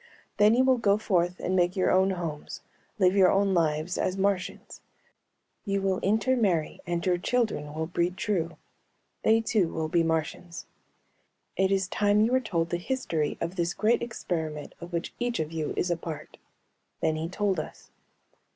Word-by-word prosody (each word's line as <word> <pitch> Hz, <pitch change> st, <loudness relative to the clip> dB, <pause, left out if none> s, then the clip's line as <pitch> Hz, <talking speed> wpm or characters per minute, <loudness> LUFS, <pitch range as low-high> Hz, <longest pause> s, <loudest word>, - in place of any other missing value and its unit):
"Then 210 Hz, +2 st, +5 dB
you 255 Hz, -, +4 dB
will 260 Hz, -1 st, +3 dB
go 205 Hz, -2 st, +3 dB
forth 180 Hz, -4 st, 0 dB
and 185 Hz, -, -1 dB
make 180 Hz, 0 st, +2 dB
your 185 Hz, -, +2 dB
own 190 Hz, +1 st, +4 dB
homes, 165 Hz, -5 st, -5 dB, 0.4 s
live 185 Hz, -2 st, +3 dB
your 190 Hz, -2 st, +6 dB
own 195 Hz, 0 st, +2 dB
lives, 160 Hz, 0 st, 0 dB
as 185 Hz, +1 st, 0 dB
Martians. 195 Hz, -1 st, -2 dB, 0.8 s
You 195 Hz, -2 st, -1 dB
will 190 Hz, -1 st, +1 dB
intermarry 210 Hz, -6 st, +1 dB
and 170 Hz, 0 st, -2 dB
your 180 Hz, -1 st, +2 dB
children 215 Hz, -10 st, -1 dB
will 160 Hz, 0 st, -1 dB
breed 175 Hz, +2 st, -1 dB
true. 170 Hz, -6 st, -1 dB, 0.6 s
They 225 Hz, +1 st, +4 dB
too 210 Hz, -6 st, +1 dB
will 160 Hz, -1 st, -2 dB
be 170 Hz, +1 st, +3 dB
Martians. 165 Hz, +1 st, -2 dB, 0.9 s
"It 190 Hz, 0 st, +2 dB
is 195 Hz, -1 st, +1 dB
time 205 Hz, +2 st, +2 dB
you 225 Hz, +3 st, +3 dB
were 260 Hz, -, +4 dB
told 170 Hz, -9 st, -2 dB
the 175 Hz, -, +1 dB
history 175 Hz, -, -2 dB
of 170 Hz, +2 st, -3 dB
this 170 Hz, 0 st, 0 dB
great 225 Hz, +3 st, +2 dB
experiment 160 Hz, -10 st, -4 dB
of 170 Hz, +1 st, -8 dB
which 170 Hz, -1 st, -3 dB
each 240 Hz, -1 st, -1 dB
of 155 Hz, 0 st, -2 dB
you 160 Hz, -2 st, -3 dB
is 175 Hz, -, 0 dB
a 170 Hz, -, +1 dB
part." 165 Hz, -2 st, -8 dB, 0.6 s
Then 160 Hz, -1 st, +1 dB
he 160 Hz, +1 st, -3 dB
told 195 Hz, -1 st, 0 dB
us. -, -, -9 dB
180 Hz, 175 wpm, -27 LUFS, 165-205 Hz, 0.9 s, your